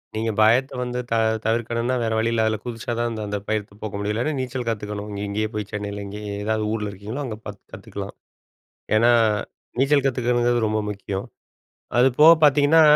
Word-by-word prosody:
நீங்க 110 +1 0
பயத்த 120 +5 +4
வந்து, 125 0 -3
தவி 115 -1 +3 0.2
தவிர்க்கணுன்னா, 115 +2 0
வேற 110 - 0
வழி 115 +1 +1
இல்ல, 115 - +1
அதுல 110 0 +1
குதிச்சா 120 +1 -5
தான் 120 0 +1
அந்த 110 -1 -4
அந்த 105 0 -2
பயத்த 105 -1 -2
போக்க 110 -1 -5
முடியும். 105 +1 -1
இல்லைனா, 125 +8 -1
நீச்சல் 125 -1 -3
கத்துக்கணும் 105 -1 -4
இங்க 100 0 -5
இங்கே 110 +2 -1
போய் 105 -1 -4
சென்னைல 105 -1 -4
இங்கயே 105 +1 -6
ஏதாவது 110 0 0
ஊருல 105 -2 -2
இருக்கீங்களோ, 105 +8 -6
அங்க 110 -4 -5
பாத்து 105 -2 -8
கத்துக்கலாம். - - -7 0.8
ஏன்னா, 115 +2 +5 0.7
நீச்சல் 140 +1 +3
கத்துக்கணுங்கறது 120 -2 +1
ரொம்ப 110 0 0
முக்கியம். 100 -1 -4 0.7
அது 125 +2 +6
போக 160 +2 +10
பாத்தீங்கன்னா, 145 +2 +6
110 Hz, 175 wpm, -23 LUFS, 105-120 Hz, 0.8 s, போக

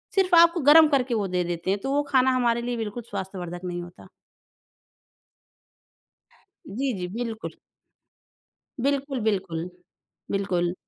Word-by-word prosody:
सिर्फ़ 375 -2 +3
आपको 335 +1 +6
गर्म 305 +3 +7
करके 270 -4 +1
वो 210 -3 0
दे 180 -1 -1
देते 175 +1 -4
हैं, 200 - 0
तो 270 - -4
वो 290 +1 +2
खाना 260 -1 +4
हमारे 235 -1 +1
लिए 240 0 -3
बिल्कुल 225 +1 -5
स्वास्थ्यवर्धक 185 -3 -6
नहीं 175 -1 -4
होता। 175 0 -14 2.6
जी, 260 +3 -2
जी। 180 - -3
बिल्कुल। 230 -2 -5 1.3
बिल्कुल, 275 -2 -1
बिल्कुल। 180 -4 -3 0.6
बिल्कुल। 180 -3 0
225 Hz, 125 wpm, -25 LUFS, 180-270 Hz, 2.6 s, गर्म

